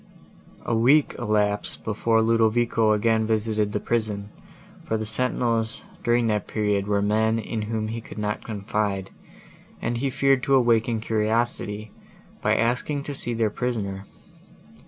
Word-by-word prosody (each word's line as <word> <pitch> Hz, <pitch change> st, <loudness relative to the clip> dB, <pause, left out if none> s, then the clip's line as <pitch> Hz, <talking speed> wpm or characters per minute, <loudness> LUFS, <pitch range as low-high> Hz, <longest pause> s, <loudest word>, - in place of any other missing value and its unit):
A -, -, -1 dB
week 135 Hz, +6 st, +4 dB
elapsed, 105 Hz, -3 st, 0 dB
before 110 Hz, +1 st, +1 dB
Ludovico 115 Hz, 0 st, +3 dB
again 110 Hz, +1 st, +2 dB
visited 110 Hz, -1 st, 0 dB
the 105 Hz, -, -1 dB
prison; 105 Hz, -3 st, -2 dB, 0.5 s
for 110 Hz, -, -2 dB
the 110 Hz, -, -3 dB
sentinels, 115 Hz, 0 st, -1 dB, 0.2 s
during 120 Hz, 0 st, +2 dB
that 105 Hz, -2 st, 0 dB
period, 105 Hz, -2 st, 0 dB
were 100 Hz, -1 st, +1 dB
men, 110 Hz, +2 st, +2 dB
in 110 Hz, 0 st, -3 dB
whom 110 Hz, 0 st, -2 dB
he 115 Hz, +1 st, -4 dB
could -, -, -11 dB
not 105 Hz, 0 st, -2 dB
confide, 100 Hz, -2 st, -2 dB, 0.7 s
and 120 Hz, +1 st, -2 dB
he 135 Hz, +3 st, 0 dB
feared 135 Hz, 0 st, +2 dB
to 135 Hz, +1 st, +3 dB
awaken 115 Hz, -2 st, +2 dB
curiosity, 110 Hz, -1 st, -1 dB, 0.5 s
by -, -, +2 dB
asking 125 Hz, +5 st, 0 dB
to 145 Hz, -, -5 dB
see 120 Hz, -3 st, -2 dB
their 110 Hz, -2 st, +1 dB
prisoner. 100 Hz, -6 st, -3 dB
110 Hz, 140 wpm, -24 LUFS, 105-120 Hz, 0.7 s, week